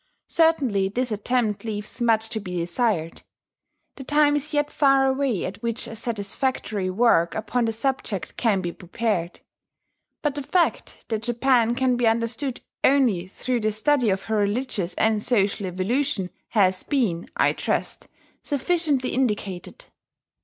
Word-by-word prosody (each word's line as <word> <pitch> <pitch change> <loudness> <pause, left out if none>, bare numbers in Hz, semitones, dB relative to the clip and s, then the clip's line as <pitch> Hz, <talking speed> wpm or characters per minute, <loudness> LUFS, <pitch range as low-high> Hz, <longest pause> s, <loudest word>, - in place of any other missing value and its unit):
Certainly 265 -13 +2
this 245 +3 -2
attempt 215 0 0
leaves 215 +1 -5
much 225 -2 +2
to 220 -1 -3
be 180 -3 -5
desired: 170 -1 -1 0.8
the 270 - -7
time 295 +1 +3
is 295 +1 -2
yet 295 -1 0
far 275 -2 +4
away 265 -6 0
at 185 - -6
which 235 0 -2
a 225 - -7
satisfactory 215 -2 -2
work 185 -4 +3
upon 230 +2 0
the 225 - 0
subject 225 -5 -3
can 210 -5 +1
be 175 -1 -3
prepared. 180 -1 -3 0.8
But 295 -2 +1
the 290 - -4
fact 340 +5 0
that 220 -2 -1
Japan 240 0 +2
can 255 -1 +2
be 240 -1 +2
understood 230 +4 -1 0.2
only 240 -11 +3
through 245 +5 -2
the 215 -1 0
study 245 +2 +2
of 190 0 0
her 220 -1 -1
religious 205 -4 -1
and 220 -1 +2
social 205 -4 +1
evolution 195 +2 -1 0.2
has 185 -4 +2
been, 220 - -1
I - - +3
trust, - - -2 0.3
sufficiently 290 -2 0
indicated. 210 - -2
230 Hz, 145 wpm, -24 LUFS, 200-265 Hz, 0.8 s, far